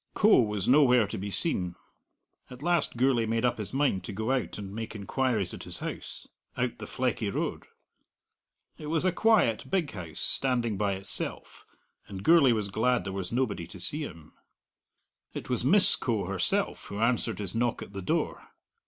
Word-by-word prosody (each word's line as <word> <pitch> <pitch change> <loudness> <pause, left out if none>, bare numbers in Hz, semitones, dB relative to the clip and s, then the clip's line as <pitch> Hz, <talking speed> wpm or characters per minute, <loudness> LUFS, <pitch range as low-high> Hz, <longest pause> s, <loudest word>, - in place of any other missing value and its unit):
Coe 210 -9 +5
was 105 -4 -2
nowhere 125 -4 +5
to 100 - -6
be 100 +2 -4
seen. 90 - 0 0.7
At 125 +2 -11
last 175 -7 +1
Gourlay 125 -3 +2
made 115 +2 0
up 120 - 0
his 105 - -5
mind 135 -8 0
to 115 - -6
go 110 +5 -2
out 130 -3 -1
and 100 -2 -7
make 115 +1 -6
inquiries 110 0 -1
at - - -8
his - - -1
house, - - -7 0.3
out 125 -1 -2
the - - -7
Fleckie 120 -4 -1
Road. - - -3 1.1
It 150 - -7
was 160 +3 0
a 185 - +3
quiet, 180 - +2
big 180 -6 0
house, 85 -6 -8
standing 120 -5 0
by 100 0 0
itself, 95 +1 -2 0.4
and 95 -1 -8
Gourlay 160 -6 +6
was 105 -3 -1
glad 120 +5 +1
there 95 - -5
was 95 -2 -4
nobody 115 -9 -1
to 95 - -11
see 145 - -2
him. 80 - -9 1.0
It - - -6
was - - +2
Miss - - +6
Coe - - -1
herself - - +1
who 100 - -7
answered 115 -4 +1
his 100 -3 -4
knock 120 +1 -1
at - - -13
the 100 - -5
door. 90 - -2
115 Hz, 180 wpm, -28 LUFS, 100-130 Hz, 1.1 s, Gourlay